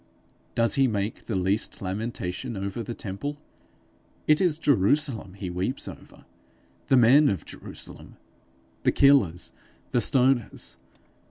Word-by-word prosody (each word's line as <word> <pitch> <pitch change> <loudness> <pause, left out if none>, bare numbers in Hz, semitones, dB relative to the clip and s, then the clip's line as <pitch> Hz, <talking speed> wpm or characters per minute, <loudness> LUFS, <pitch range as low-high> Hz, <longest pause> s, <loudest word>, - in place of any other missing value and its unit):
Does 115 0 +2
he 135 -2 +3
make 105 -2 -3
the 110 - -2
least 95 +4 0
lamentation 100 +3 -4
over 100 +4 -4
the 115 +1 -5
temple? 125 +10 -5 0.9
It 155 +2 +4
is 175 -5 +2
Jerusalem 115 - +1
he 95 -3 -5
weeps 95 +9 -3
over - - -12 0.6
the 135 - +5
men 130 +5 +6
of 100 - -3
Jerusalem, - - -10 0.6
the - - +3
killers, 105 - +3 0.4
the 120 - +2
stoners. 125 -1 0
115 Hz, 120 wpm, -26 LUFS, 95-135 Hz, 0.9 s, men